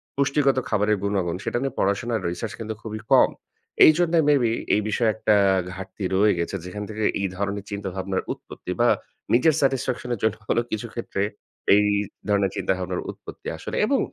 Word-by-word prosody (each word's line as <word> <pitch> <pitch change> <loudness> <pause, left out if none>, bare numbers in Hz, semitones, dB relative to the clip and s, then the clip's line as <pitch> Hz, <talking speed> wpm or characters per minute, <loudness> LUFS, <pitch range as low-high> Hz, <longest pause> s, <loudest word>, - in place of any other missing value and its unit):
পুষ্টিগত 140 0 +2
খাবারের 105 0 +2
গুণাগুণ, 95 -4 0
সেটা - - -1
নিয়ে 135 -2 -2
পড়াশোনার 110 +3 0
রিসার্চ 90 +5 -4
কিন্তু 110 -1 -4
খুবই 110 -1 -6
কম। - - +7 0.6
এইজন্য 165 +2 +4 0.2
মেবি 130 -6 +3 0.2
এই 105 - +2
বিষয়ে 110 +1 +2
একটা 110 -1 +2 0.4
ঘাটতি 95 +2 -8
রয়ে 105 +2 +4
গেছে। 85 +3 -2
যেখান 105 +3 -5
থেকে 110 0 -4 0.2
এই 100 - 0
ধরনের 100 +1 -3
চিন্তাভাবনার 95 -1 -3
উৎপত্তি - - -9
বা - - +5 0.4
নিজের 140 +7 +5
স্যাটিসফ্যাকশন 130 -2 0
এর - - -12
জন্য 110 0 +2
হলেও 120 - +1
কিছু 110 +2 -3
ক্ষেত্রে 115 -4 -3 0.5
এই 105 0 +4 0.4
ধরনের 100 -2 +2
চিন্তাভাবনার 90 -1 -1
উৎপত্তি - - -11
আসলে। - - -6
এবং - - +2
105 Hz, 160 wpm, -24 LUFS, 100-120 Hz, 0.6 s, কম